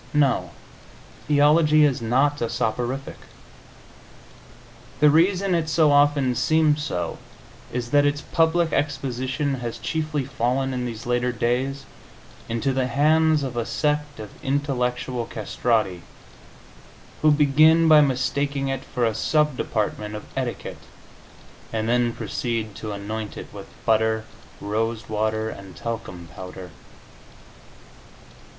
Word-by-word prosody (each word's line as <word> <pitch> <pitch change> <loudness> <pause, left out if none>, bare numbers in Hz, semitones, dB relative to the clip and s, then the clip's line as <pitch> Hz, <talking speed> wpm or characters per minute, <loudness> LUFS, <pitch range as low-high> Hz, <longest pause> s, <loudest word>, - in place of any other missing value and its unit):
No, 140 -5 +2 0.8
theology 150 +1 +5
is 135 -4 0
not 135 +6 +1
a 115 - 0
soporific. 120 +5 -2 1.8
The 150 0 +6
reason 185 +4 +3
it 165 -2 0
so 155 -2 +4
often 145 -2 +3
seems 155 +3 +2
so 115 -13 -3 0.5
is 120 0 -4
that 145 0 +5
its 145 0 0
public 165 0 +1
exposition 135 0 -1
has 120 -1 -5
chiefly 155 +3 -2
fallen, 130 +1 -1
in 125 -1 -2
these 115 -1 -7
later 120 +1 0
days, 130 +4 -1 0.6
into 115 +4 0
the 130 -1 0
hands 155 +3 +3
of 130 -3 -4
a 120 - 0
sect 150 +2 -1
of 105 -2 -8
intellectual 125 -3 -1
castrati, 110 -4 -1 1.2
who 155 - +5
begin 155 +3 +5
by 155 -1 +8
mistaking 140 +1 0
it 135 0 -3
for 125 -3 -1
a 115 - +1
sub 150 +3 +1
department 105 -2 -2
of 105 - -7
etiquette, 130 -3 -4 0.9
and 110 -1 -2
then 120 0 +2
proceed 115 0 -3
to 110 +1 -6
anoint 105 +2 -5
it - - -9
with - - -9 0.2
butter, 110 0 +2 0.3
rose 110 +2 -2
water 110 +1 -1
and 95 -3 -11
talcum 90 -2 -6
powder. 90 -1 -9
130 Hz, 120 wpm, -23 LUFS, 115-145 Hz, 1.8 s, by